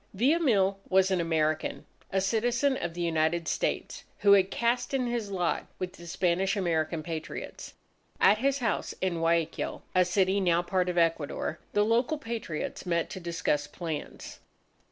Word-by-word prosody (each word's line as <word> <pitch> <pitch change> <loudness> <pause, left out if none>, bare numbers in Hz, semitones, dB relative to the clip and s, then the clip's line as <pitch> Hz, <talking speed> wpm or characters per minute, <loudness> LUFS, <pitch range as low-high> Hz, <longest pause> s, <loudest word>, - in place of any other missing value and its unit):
Villamil 225 - +3
was 190 0 +4
an 185 -2 +2
American, 155 -2 0 0.3
a 195 - +2
citizen 240 +7 +1
of 170 -8 -4
the 175 - -4
United 165 0 +1
States, - - -2 0.2
who 200 - +5
had 195 -1 +6
cast 240 +5 0
in 255 -2 +1
his 235 -4 -2
lot 180 -3 -1
with 185 0 -4
the 170 -2 -12
Spanish 185 +3 +1
American 165 -3 0
Patriots. 160 -1 -6 0.4
At 205 +2 +5
his 275 +2 +2
house 235 -5 -2
in 180 -3 -1
Guayaquil 165 -1 0
(a 185 - +5
city 190 +2 +2
now 175 -3 +3
a - - -11
part 180 0 0
of 175 - -3
Ecuador) 165 -1 0
the 205 0 +3
local 240 +7 +2
Patriots 225 - -4
met 170 -1 0
to 190 - -5
discuss 170 -4 -1
plans. 160 0 -6
185 Hz, 160 wpm, -29 LUFS, 170-215 Hz, 0.4 s, had